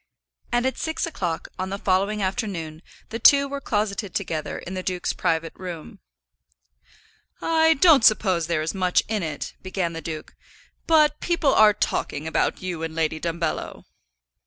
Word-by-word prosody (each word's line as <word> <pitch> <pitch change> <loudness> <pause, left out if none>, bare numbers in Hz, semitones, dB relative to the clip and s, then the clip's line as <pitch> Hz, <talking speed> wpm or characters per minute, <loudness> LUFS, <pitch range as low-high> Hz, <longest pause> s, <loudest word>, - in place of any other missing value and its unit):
And 240 +1 +1
at 260 - -1
six 320 0 -2
o'clock 175 - -4
on 185 0 -2
the 195 - -3
following 200 +2 +1
afternoon 185 -7 -3 0.3
the 225 - -5
two 280 +4 +6
were 280 0 -5
closeted 205 -4 -2
together 165 -6 -3
in 185 - -7
the 185 - -3
duke's 180 -1 -2
private 165 -2 -1
room. 175 -4 -8 1.4
"I 320 0 +3
don't 295 -4 +6
suppose 185 -7 +3
there 170 -2 0
is 160 - -2
much 185 -2 +2
in 215 -2 -1
it," 155 -4 -4
began 185 -2 -2
the 165 - -6
duke, 155 -2 -7 0.5
"but 305 -2 +4
people 335 -5 +1
are 215 -1 +6
talking 155 -6 -2
about 160 - 0
you 180 -3 -4
and 165 -1 -4
Lady 160 -1 0
Dumbello." 165 -1 -3
185 Hz, 160 wpm, -24 LUFS, 165-225 Hz, 1.4 s, two